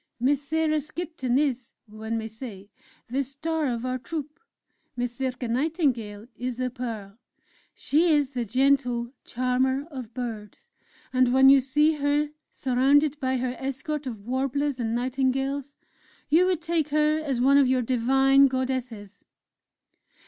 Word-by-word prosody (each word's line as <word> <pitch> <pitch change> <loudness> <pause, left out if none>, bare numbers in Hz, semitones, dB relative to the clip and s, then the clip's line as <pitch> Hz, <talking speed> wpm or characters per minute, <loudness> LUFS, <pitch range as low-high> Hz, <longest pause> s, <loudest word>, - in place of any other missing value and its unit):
"Miss 275 +3 +2
Sarah 310 +1 0
Skipton 305 -4 -3
is, 260 -4 -1
one 220 +1 -5
may 220 0 -4
say, 215 -3 -9 0.4
the 265 +4 -1
Star 300 +3 -2
of 240 -1 -2
our 255 0 -2
Troupe; 300 +2 -6 0.6
Miss 245 0 -4
Circé 255 -2 -2
Nightingale 245 - -1
is 250 0 -4
the 255 +1 -2
Pearl! 225 -4 -6 0.6
She 315 +5 +2
is 290 -3 +2
the 250 -3 -2
gentle 250 0 +1
'Charmer 255 +2 0
of 255 -5 -7
Birds' 225 -5 -7 0.4
and 255 -1 +3
when 265 +1 +6
you 275 - +7
see 295 +4 +2
her 290 +1 +1 0.2
surrounded 275 +3 +2
by 260 -1 0
her 250 0 -2
escort 275 +2 -4
of 220 -5 -7
warblers 270 +2 -1
and 230 -1 -1
nightingales, 270 +2 -1 0.5
you 340 +5 +5
would 360 -3 0
take 325 -2 0
her 305 +1 +2
as 280 -6 -2
one 275 +3 +5
of 275 - +4
your 255 -1 +2
divine 270 +3 +4
Goddesses!..." 250 -6 -4
260 Hz, 140 wpm, -26 LUFS, 245-285 Hz, 0.6 s, you